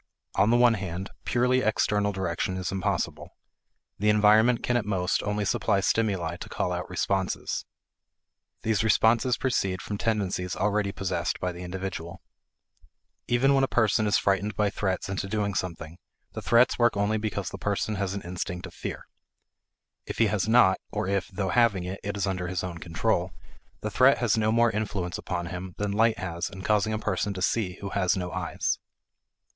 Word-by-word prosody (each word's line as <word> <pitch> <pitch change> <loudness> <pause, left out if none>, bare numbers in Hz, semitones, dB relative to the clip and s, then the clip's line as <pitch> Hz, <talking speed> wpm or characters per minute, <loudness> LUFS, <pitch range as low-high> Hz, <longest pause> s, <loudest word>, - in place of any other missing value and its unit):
On 105 - +3
the 120 - +5
one 120 -1 +6
hand, 95 -2 -4
purely 125 +1 +2
external 105 -2 +1
direction 95 -1 -2
is 90 -2 -3
impossible. 95 -1 -2 0.6
The 105 +2 +2
environment 110 +3 +5
can 125 - +1
at 120 - +2
most 95 -3 0
only 105 0 -1
supply 100 +1 +1
stimuli 95 -5 0
to - - -8
call - - -1
out - - -3
responses. 95 -1 -1 1.0
These 110 -1 +1
responses 115 +3 +3
proceed 100 -8 0
from 105 -1 -5
tendencies 95 -5 -1
already 100 0 0
possessed 95 -1 -2
by 90 - -1
the 90 0 -9
individual. 90 -2 -6 1.0
Even 130 +3 +3
when 135 -1 +3
a - - +3
person 110 -3 +2
is 105 - +3
frightened 100 +1 0
by 105 -1 +1
threats 95 -3 -2
into 95 0 -3
doing 100 0 -1
something, 85 -2 -4 0.3
the - - -5
threats 120 +2 +4
work 120 -3 +3
only 105 +2 +1
because 105 -2 -3
the - - -7
person 105 +1 -1
has 100 0 -2
an 100 - -5
instinct 90 +1 -4
of 90 - -10
fear. - - -6 1.0
If - - -5
he 115 - +4
has 105 0 0
not, 110 -5 +5
or - - -2
if, 100 -2 0
though 95 0 -3
having 115 -6 +3
it, 95 +2 -5
it 100 0 -3
is 100 - 0
under 90 -2 -2
his 90 0 -2
own 85 -2 -5
control, 90 +2 -1 0.5
the 105 - -3
threat 130 +5 +5
has 120 -4 +2
no 110 -1 +2
more 115 0 +4
influence 100 -4 -3
upon 90 -1 -3
him 90 +1 -6
than 105 -1 -1
light 110 +2 +3
has 85 -1 -3
in 95 0 -9
causing 105 0 +2
a 110 - 0
person 100 -1 -1
to 95 - -5
see 95 -5 0
who 100 - -4
has 95 -1 +1
no 90 -1 -3
eyes. - - -2
100 Hz, 185 wpm, -27 LUFS, 95-110 Hz, 1.0 s, one